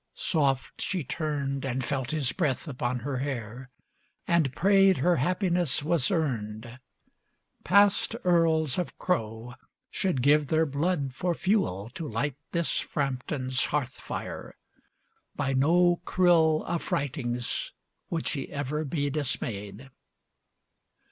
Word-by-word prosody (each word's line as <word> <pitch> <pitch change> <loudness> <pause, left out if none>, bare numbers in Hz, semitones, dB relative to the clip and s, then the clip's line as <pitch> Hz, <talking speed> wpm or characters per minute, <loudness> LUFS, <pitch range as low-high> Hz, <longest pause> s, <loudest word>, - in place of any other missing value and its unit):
Soft 140 -5 0
she 185 -5 -1
turned 140 -1 -2
And 130 -1 -2
felt 135 -3 -2
his 150 -5 0
breath 150 -4 -1
upon 125 -3 -2
her 135 +2 -3
hair, 125 -2 -5 0.6
and 165 -6 +3
prayed 195 -1 +5
Her 175 +6 +3
happiness 175 -1 +1
was 155 -4 +2
earned. 120 - -2 0.8
Past 200 +3 +4
Earls 165 -4 +3
of 180 - -4
Crowe 115 -8 -2 0.4
should 175 -10 0
give 145 +1 +4
their 160 +2 +2
blood 145 -1 -1
for 175 +6 -1
fuel 185 - 0
To 155 +4 -6
light 135 +4 -1 0.2
this 170 -2 0
Frampton's 130 -2 -1
hearth 140 -4 -1
fire. - - -7 0.8
By 140 -2 -1
no 175 +6 +4
cruel 165 -4 +3
Affrightings 130 -7 -2 0.4
would 165 -2 -2
she 140 -4 -3
ever 145 +2 -2
be 145 -1 -1
dismayed. 120 -4 -3
145 Hz, 115 wpm, -28 LUFS, 130-170 Hz, 0.8 s, prayed